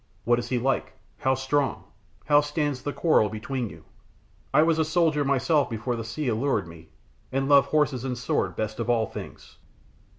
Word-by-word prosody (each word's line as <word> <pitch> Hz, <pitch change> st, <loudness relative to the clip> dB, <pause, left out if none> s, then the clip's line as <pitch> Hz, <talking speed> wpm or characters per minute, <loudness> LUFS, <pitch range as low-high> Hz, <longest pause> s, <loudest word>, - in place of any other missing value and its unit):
What 120 Hz, 0 st, +3 dB
is 120 Hz, 0 st, -5 dB
he 125 Hz, -, +1 dB
like? 135 Hz, +3 st, -1 dB, 0.3 s
How 130 Hz, 0 st, +2 dB
strong? 135 Hz, +1 st, -1 dB, 0.4 s
How 145 Hz, 0 st, +5 dB
stands 145 Hz, -2 st, -2 dB
the 145 Hz, -, -3 dB
quarrel 150 Hz, -10 st, +3 dB
between 115 Hz, +2 st, -4 dB
you? -, -, -13 dB, 0.7 s
I 155 Hz, -, +5 dB
was 160 Hz, 0 st, +2 dB
a -, -, +4 dB
soldier 160 Hz, -2 st, +2 dB
myself 140 Hz, +2 st, +2 dB
before 115 Hz, +2 st, -3 dB
the 115 Hz, -, -4 dB
sea 130 Hz, +6 st, -4 dB
allured 115 Hz, -4 st, 0 dB
me, 85 Hz, -1 st, -13 dB, 0.4 s
and 135 Hz, +1 st, 0 dB
love 140 Hz, -1 st, +6 dB
horse 150 Hz, -2 st, +2 dB
and 130 Hz, -2 st, -3 dB
sword 125 Hz, -, -1 dB
best 110 Hz, +1 st, -3 dB
of 115 Hz, -, -2 dB
all 115 Hz, -2 st, +3 dB
things." -, -, -10 dB
135 Hz, 185 wpm, -26 LUFS, 115-145 Hz, 0.7 s, love